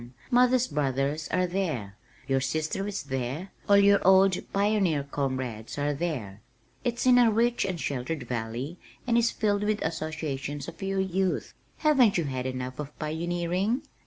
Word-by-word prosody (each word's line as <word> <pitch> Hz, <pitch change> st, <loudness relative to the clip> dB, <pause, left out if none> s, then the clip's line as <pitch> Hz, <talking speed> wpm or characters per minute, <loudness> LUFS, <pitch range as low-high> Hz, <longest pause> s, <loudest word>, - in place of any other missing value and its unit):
Mother's 250 Hz, 0 st, +4 dB
brothers 145 Hz, +1 st, -1 dB
are 185 Hz, 0 st, +1 dB
there, 160 Hz, -, -2 dB, 0.3 s
your 135 Hz, -1 st, +2 dB
sister 155 Hz, +8 st, -1 dB
is 205 Hz, -1 st, -4 dB
there, 135 Hz, +8 st, -4 dB, 0.2 s
all 200 Hz, -, +7 dB
your 200 Hz, 0 st, +6 dB
old 190 Hz, 0 st, +4 dB
pioneer 195 Hz, -7 st, +2 dB
comrades 130 Hz, -5 st, -3 dB
are 145 Hz, +1 st, 0 dB
there. 130 Hz, -, -4 dB, 0.4 s
It's 240 Hz, +1 st, -1 dB
in 250 Hz, -1 st, +7 dB
a 240 Hz, -2 st, +6 dB
rich 235 Hz, +2 st, +2 dB
and 185 Hz, -3 st, -3 dB
sheltered 140 Hz, +1 st, -3 dB
valley 120 Hz, +7 st, -4 dB, 0.3 s
and 240 Hz, -2 st, +1 dB
is 235 Hz, 0 st, +4 dB
filled 205 Hz, -2 st, 0 dB
with 210 Hz, 0 st, +1 dB
associations 150 Hz, -3 st, -3 dB
of -, -, -9 dB
your 195 Hz, 0 st, -1 dB
youth. 190 Hz, 0 st, -1 dB, 0.2 s
Haven't 270 Hz, -10 st, +4 dB
you 170 Hz, -, +1 dB
had 130 Hz, -3 st, -3 dB
enough 130 Hz, 0 st, -5 dB
of 150 Hz, 0 st, -6 dB
pioneering? 175 Hz, -, -1 dB
165 Hz, 155 wpm, -27 LUFS, 135-200 Hz, 0.4 s, all